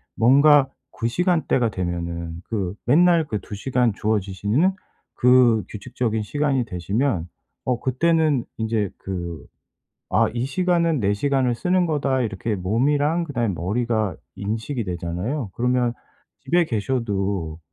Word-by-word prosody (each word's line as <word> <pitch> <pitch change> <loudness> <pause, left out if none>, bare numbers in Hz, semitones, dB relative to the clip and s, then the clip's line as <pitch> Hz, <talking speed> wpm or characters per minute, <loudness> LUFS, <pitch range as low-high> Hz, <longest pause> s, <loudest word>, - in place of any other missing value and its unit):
뭔가 140 +4 +6 0.3
그 115 - 0
시간대가 160 -4 +1
되면은, 85 -2 -4
그 100 -4 -2
맨날 170 +4 +4
그 105 -5 -2
2 105 - -8
시간 125 +2 +1
주어지시는 105 - 0 0.4
그 125 -3 +5
규칙적인 110 +1 -3
시간이 140 +1 0
되시면 95 - -1 0.4
어 125 -2 0
그때는 150 +1 +1
인제 110 -3 -1
그 85 -4 -6 0.7
아 - - +3
"이 120 0 -1
시간은 170 0 +1
내 100 -1 +2
시간을 130 +2 +1
쓰는 180 +5 +1
거다." 140 -4 0
이렇게 110 0 -2
몸이랑 145 - +1
그다음에 120 - -1
머리가 110 +1 -1 0.2
인식이 110 +5 -3
되잖아요. 90 - -3
그러면 125 0 +1 0.5
집에 175 +1 +2
계셔도, 100 - -2
120 Hz, 270 characters per minute, -23 LUFS, 100-140 Hz, 0.7 s, 뭔가